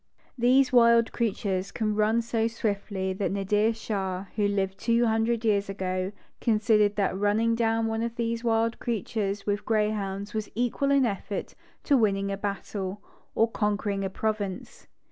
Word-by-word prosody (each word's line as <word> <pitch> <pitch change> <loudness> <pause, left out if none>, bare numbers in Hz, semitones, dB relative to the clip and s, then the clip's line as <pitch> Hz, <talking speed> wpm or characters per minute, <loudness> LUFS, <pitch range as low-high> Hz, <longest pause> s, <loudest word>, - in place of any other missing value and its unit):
These 260 +3 +3
wild 235 -1 +5
creatures 195 -4 -1
can 215 -2 -1
run 215 +2 +2
so 225 -1 0
swiftly 200 -4 -2
that 195 +1 -2
Nadir 205 +3 +1
Shah, 195 -4 -3
who 210 -1 +2
lived 195 -1 -1
two 235 0 +2
hundred 225 +1 +1
years 205 -2 +2
ago, 185 -1 -2 0.3
considered 210 -2 +3
that 195 -2 0
running 210 +3 +2
down 225 0 +1
one 225 0 -1
of 230 0 -3
these 230 0 -2
wild 230 0 +1
creatures 210 -3 -2
with 205 0 -1
grey 215 -1 +1
hounds 200 0 -4
was 215 -1 -3
equal 245 +4 0
in 280 -2 +4
effort 200 -2 -4 0.3
to 285 - +3
winning 200 -4 +2
a 195 - -2
battle, 200 -1 -4 0.4
or 225 +1 +3
conquering 205 -2 -1
a 195 - -1
province. 205 -1 -4
215 Hz, 160 wpm, -27 LUFS, 200-230 Hz, 0.4 s, wild